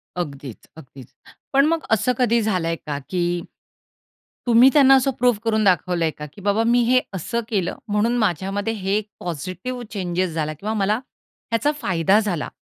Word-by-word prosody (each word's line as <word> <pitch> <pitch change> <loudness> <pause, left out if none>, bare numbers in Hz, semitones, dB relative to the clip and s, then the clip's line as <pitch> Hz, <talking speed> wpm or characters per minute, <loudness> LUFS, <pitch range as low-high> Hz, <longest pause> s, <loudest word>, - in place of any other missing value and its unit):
अगदीच 140 -8 -6
अगदीच. 135 -4 -13 0.5
पण 275 +1 +5
मग 325 +1 0
असं 225 +3 +2
कधी 235 -2 +2
झालंय 180 -6 0
का 150 -2 -3
की, 175 -1 -1 1.1
तुम्ही 240 +2 +7
त्यांना 270 -3 +7
असं 270 +1 +2
प्रूफ 245 -3 +3
करून 220 -1 +1
दाखवलंय 180 -4 +2
का, 150 - -9
की 200 - -13
बाबा 205 +3 +1
मी 240 +1 +3
हे 255 0 +5
असं 195 +6 -3
केलं 195 -6 -1
म्हणून 210 +4 +1
माझ्यामध्ये 200 +1 -1
हे 200 0 -1 0.2
पॉझिटिव्ह 185 - -5
चेंजेस 180 -3 -2
झाला 155 -1 -2
किंवा 205 +9 -4
मला 205 -1 +1 0.6
ह्याचा 230 +6 +2
फायदा 185 +3 +2
झाला 190 -8 -2
200 Hz, 155 wpm, -22 LUFS, 175-235 Hz, 1.1 s, तुम्ही